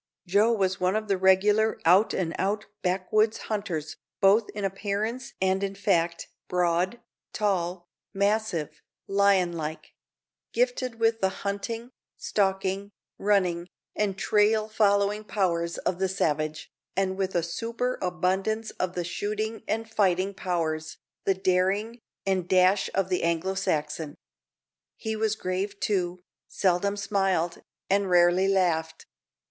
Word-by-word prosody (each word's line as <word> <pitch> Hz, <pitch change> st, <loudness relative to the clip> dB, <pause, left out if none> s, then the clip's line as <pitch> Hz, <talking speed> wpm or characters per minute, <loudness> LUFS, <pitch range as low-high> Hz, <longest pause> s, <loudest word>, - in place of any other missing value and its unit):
Joe 205 Hz, +5 st, +3 dB
was 195 Hz, -4 st, +1 dB
one 185 Hz, +2 st, +1 dB
of 215 Hz, 0 st, -1 dB
the 195 Hz, -, +2 dB
regular 205 Hz, +4 st, +4 dB
out 185 Hz, +6 st, +5 dB
and 165 Hz, -3 st, -1 dB
out 205 Hz, +2 st, 0 dB, 0.2 s
backwoods 200 Hz, +4 st, +1 dB, 0.2 s
hunters, 170 Hz, -7 st, -3 dB, 0.2 s
both 205 Hz, +3 st, +4 dB
in 205 Hz, -1 st, -2 dB
appearance 210 Hz, +5 st, -3 dB
and 190 Hz, 0 st, +1 dB
in 195 Hz, 0 st, -2 dB
fact 170 Hz, -3 st, 0 dB, 0.2 s
broad, 180 Hz, +4 st, +1 dB, 0.3 s
tall, 180 Hz, -4 st, -1 dB, 0.2 s
massive, 200 Hz, -5 st, -1 dB, 0.3 s
lion 195 Hz, -3 st, +3 dB
like; 155 Hz, -1 st, -6 dB, 0.6 s
gifted 365 Hz, -, 0 dB
with 225 Hz, 0 st, +2 dB
the 190 Hz, -, +3 dB, 0.2 s
hunting, 225 Hz, +4 st, -3 dB, 0.3 s
stalking, 195 Hz, 0 st, 0 dB, 0.3 s
running, 185 Hz, -4 st, +1 dB, 0.3 s
and 200 Hz, -2 st, 0 dB
trail 215 Hz, +2 st, +3 dB
following 205 Hz, -1 st, +2 dB
powers 170 Hz, -5 st, -1 dB
of 180 Hz, -, -2 dB
the 190 Hz, 0 st, +1 dB
savage, 155 Hz, -4 st, -1 dB, 0.3 s
and 190 Hz, -1 st, +1 dB
with 190 Hz, -1 st, -2 dB
a 170 Hz, -, +2 dB
superabundance 215 Hz, 0 st, -1 dB
of 185 Hz, 0 st, -1 dB
the 175 Hz, -, -1 dB
shooting 215 Hz, +4 st, -3 dB
and 225 Hz, +1 st, -1 dB
fighting 195 Hz, -2 st, +2 dB
powers, 160 Hz, -4 st, -2 dB, 0.3 s
the 195 Hz, -, +3 dB
daring, 190 Hz, +5 st, +1 dB, 0.3 s
and 185 Hz, -3 st, 0 dB
dash 185 Hz, +2 st, +4 dB
of 190 Hz, -1 st, +1 dB
the 180 Hz, -, 0 dB
Anglo 170 Hz, +3 st, 0 dB
Saxon. 155 Hz, -5 st, -2 dB, 0.8 s
He 220 Hz, 0 st, -3 dB
was 220 Hz, 0 st, 0 dB
grave, 195 Hz, +1 st, -3 dB
too 180 Hz, -3 st, -1 dB, 0.2 s
seldom 200 Hz, +2 st, +1 dB
smiled, 195 Hz, -4 st, 0 dB, 0.3 s
and 200 Hz, 0 st, +2 dB
rarely 175 Hz, +1 st, +4 dB
laughed. 175 Hz, -5 st, 0 dB
195 Hz, 125 wpm, -27 LUFS, 180-210 Hz, 0.8 s, out